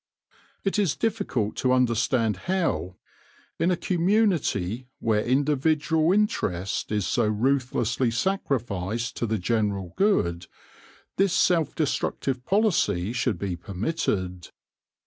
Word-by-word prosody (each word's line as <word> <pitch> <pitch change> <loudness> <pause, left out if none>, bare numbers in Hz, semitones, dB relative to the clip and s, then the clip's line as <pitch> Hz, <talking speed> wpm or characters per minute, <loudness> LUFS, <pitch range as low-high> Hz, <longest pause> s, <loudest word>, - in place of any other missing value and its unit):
It 195 +1 0
is 190 -8 +1
difficult 200 - -1
to 130 - +1
understand 115 - +2
how, 100 - 0 0.6
in 170 - +2
a 180 - +1
com 175 0 -2
munity 165 - +1
where 110 -2 +1
individual 150 +4 +2
interest 100 - 0
is 105 -3 0
so - - +1
ruthlessly 125 +1 +1
sacrificed 120 - -2
to 120 - -1
the 110 0 0
general 100 -3 -1
good, 90 - +1 0.7
this 195 -2 +3
self 165 -5 +2
destructive 135 -4 -1
policy 120 - +1
should 125 -5 0
be 95 0 -3
permitted. 95 - -3
125 Hz, 110 wpm, -25 LUFS, 105-165 Hz, 0.7 s, this